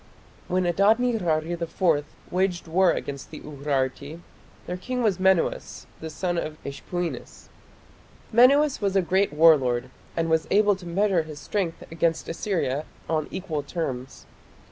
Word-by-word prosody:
When 185 0 +1
Adad 200 +6 +4
nirari 175 -10 0
IV 170 -2 +1 0.3
waged 180 -1 0
war 180 +3 +4
against 140 -1 -5
the - - -9
Urarti, 140 +1 -3 0.5
their 180 - -4
king 250 +7 -3
was 205 -5 +1
Menuas, 190 -2 +1
the 160 - -6
son 175 +2 -2
of 155 -1 -5
Ishpuinis. 170 +5 -5 0.8
Menuas 275 +4 +5
was 200 -1 0
a 195 - +4
great 190 +3 +2
war 160 +2 +7
lord, 125 -1 -2 0.3
and 165 0 +1
was 160 0 +1
able 205 0 +4
to 180 -2 -11
measure 190 0 +2
his 155 -2 -9
strength 170 +4 -3
against 165 0 0
Assyria 165 -5 -1 0.2
on 155 -2 0
equal 175 -6 -3
terms. 135 -5 -5
170 Hz, 145 wpm, -25 LUFS, 155-190 Hz, 0.8 s, war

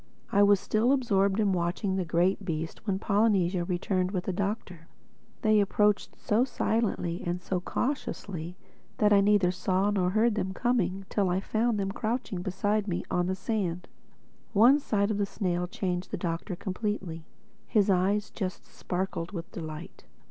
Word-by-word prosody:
I 200 - +4
was 205 -1 +6
still 225 +7 +2
absorbed 200 -6 +2
in 205 -3 +3
watching 180 +2 -1
the 190 - 0
great 175 +4 +1
beast 165 +2 -4
when 195 -2 +1
Polynesia 195 -4 +2
returned 180 +1 0
with 185 -2 -2
the 190 - -2
Doctor. 190 -4 -3 0.6
They 215 -1 +5
approached 205 0 +2
so 215 +4 +2
silently 220 -8 -1
and 175 +1 -2
so 180 0 -2
cautiously 185 - -3 0.4
that 210 0 +4
I 200 - +6
neither 200 -3 +4
saw 185 +2 +1
nor 185 -3 +1
heard 220 +4 +3
them 190 -2 -2
coming 195 -6 0
till 200 -3 +1
I 180 +1 +1
found 220 +2 0
them 195 0 -1
crouching 220 -3 -2
beside 205 +3 0
me 175 -3 -2
on 180 0 +1
the 190 - 0
sand. 185 -3 -2 0.7
One 240 +8 +6
sight 205 -6 0
of 205 - -1
the 200 - +1
snail 180 -4 -1
changed 180 -1 -3
the - - -3
Doctor 170 +2 -3
completely. 185 -4 -4 0.4
His 205 -2 +3
eyes 195 +3 +1
just 185 -4 -4
sparkled 180 -1 -4
with 170 -3 -6
delight. 155 0 -8
195 Hz, 165 wpm, -28 LUFS, 180-210 Hz, 0.7 s, was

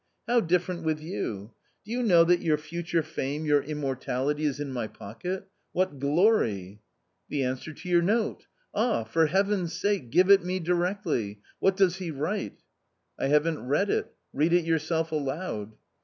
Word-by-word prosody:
How 240 +1 +4
different 180 0 0
with 160 -1 0
you? 115 - -5 0.3
do 215 - -9
you 245 +1 0
know 180 -8 +6
that 175 +1 +3
your 155 -3 +2
future 170 +2 -2
fame, 145 +2 -3
your 145 -1 +4
immortality 145 0 -2
is 145 -1 -1
in 145 -2 -3
my 120 -3 -2
pocket? 180 - -6
— - - -47
what 180 -7 0
glory! 135 - +2 0.2
" - - -49
" - - -49
The 145 -2 0
answer 130 +4 -3
to 155 - -11
your 175 -1 +4
note. 215 +6 0 0.3
Ah, 220 - +1
for 160 +9 +2
Heaven's 190 0 +1
sake, 200 - -1
give 180 +8 +5
it 195 -2 +7
me 185 +1 -1
directly; 175 - -1 0.2
what 190 0 +2
does 190 -2 +3
he 185 -3 -4
write 160 +8 -3 0.2
?" - - -49
" - - -31
I - - +1
haven't 150 +2 +2
read 170 +9 +2
it; - - -1 0.2
read 155 +4 +2
it 175 -2 +4
yourself 165 0 0
aloud." 140 - -3
160 Hz, 185 wpm, -27 LUFS, 140-185 Hz, 0.3 s, it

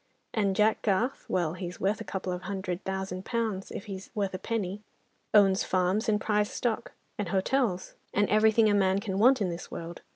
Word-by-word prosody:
And 200 -4 +1
Jack 215 +2 +3
Garth, 220 +6 0
well, 170 -3 +1
he's 180 0 -6
worth 200 +2 0
a - - -3
couple 185 -1 -3
of 180 - -5
hundred 190 -2 -4
thousand 190 -1 -3
pounds, 220 -5 -2
if - - -6
he's 195 -2 -7
worth 200 -3 -1
a 185 - -4
penny; 205 -2 -3 0.5
owns 195 -2 +5
farms 185 +5 +1
and 210 -1 +3
prize 210 0 +1
stock, 235 -3 -2 0.3
and 200 -4 -2
hotels, 195 -1 0 0.2
and 205 0 +2
everything 220 +1 +4
a 210 - +3
man 190 -1 +3
can 195 -1 -3
want 255 +2 +5
in 190 - +1
this 170 +1 -7
world. 170 0 -7
195 Hz, 195 wpm, -29 LUFS, 185-215 Hz, 0.5 s, owns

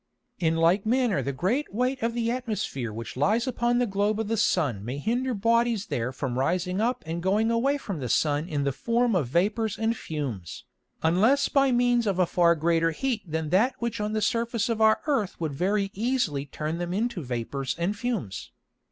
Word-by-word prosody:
In 165 -2 +2
like 170 +4 +3
manner 240 -3 +1
the 140 - -2
great 200 - -1
weight 250 +5 -1
of 230 +1 -1
the 230 -1 0
Atmosphere 215 - -3
which 115 +2 -7
lies 210 - +2
upon 240 -1 0
the 245 - +2
Globe 205 +1 0
of 220 -2 -2
the 225 - +1
Sun 150 - +1
may 125 +5 -4
hinder 245 - -1
Bodies 230 0 +2
there 120 - -2
from 130 -1 -3
rising 180 +6 0
up 245 +3 0
and 165 +2 -4
going 210 +5 +2
away 265 +5 +2
from 200 - -5
the 125 -3 -4
Sun 150 +6 +1
in 145 -2 -1
the 140 - +1
form 235 - +1
of 155 -9 +1
Vapours 205 - 0
and 225 +1 0
Fumes, 130 - -5 0.4
unless 220 +13 +3
by 275 -1 +3
means 245 -1 +2
of 195 -3 0
a 180 - +4
far 170 0 +3
greater 165 +1 +2
heat 230 +7 -2
than 160 -1 -2
that 225 - +3
which 235 -2 -3
on 210 +1 -2
the 215 -1 0
Surface 230 -1 0
of 225 -1 -1
our 220 0 +5
Earth 250 -11 -1
would 160 -4 -2
very 195 +6 0
easily 205 - -1
turn 155 +4 -4
them 175 +1 -3
into 225 -3 -1
Vapours 130 +1 -3
and 175 +5 -1
Fumes. 205 - -4
200 Hz, 200 wpm, -26 LUFS, 160-235 Hz, 0.4 s, our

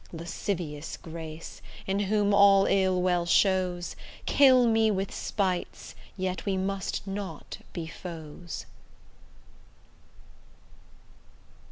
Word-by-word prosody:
Lascivious 165 -2 -4
grace, 160 -1 -8 0.2
in 195 +1 0
whom 205 0 +2
all 200 -1 +7
ill 190 -2 +2
well 180 -1 +2
shows, 180 -1 +2 0.3
Kill 260 -3 +6
me 225 -1 +4
with 195 -2 -1
spites 185 -4 -2 0.2
yet 185 -1 -2
we 195 -2 0
must 190 0 -2
not 195 -5 -6
be 170 - -5
foes. 165 0 -8
190 Hz, 90 wpm, -28 LUFS, 170-200 Hz, 0.3 s, all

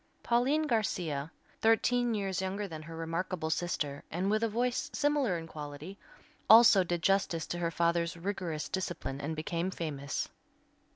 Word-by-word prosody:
Pauline 260 +6 +2
Garcia, 175 - -1 0.3
thirteen 235 +1 +3
years 195 -2 -1
younger 195 +2 -2
than 160 -4 -7
her 165 +1 -9
remarkable 165 0 -2
sister, 150 -5 -2
and 185 +5 -1
with 215 +1 +2
a 230 - +2
voice 240 +3 -1
similar 285 -10 +2
in 165 - -6
quality, 150 +3 -8 0.5
also 220 -3 +9
did 175 -1 -2
justice 195 -5 +2
to 175 - -4
her 170 -1 0
father's 170 0 0
rigorous 170 -4 -3
discipline 175 -7 -3
and 160 +3 -3
became 165 +3 -2
famous. 145 -6 -3
175 Hz, 150 wpm, -31 LUFS, 160-210 Hz, 0.5 s, also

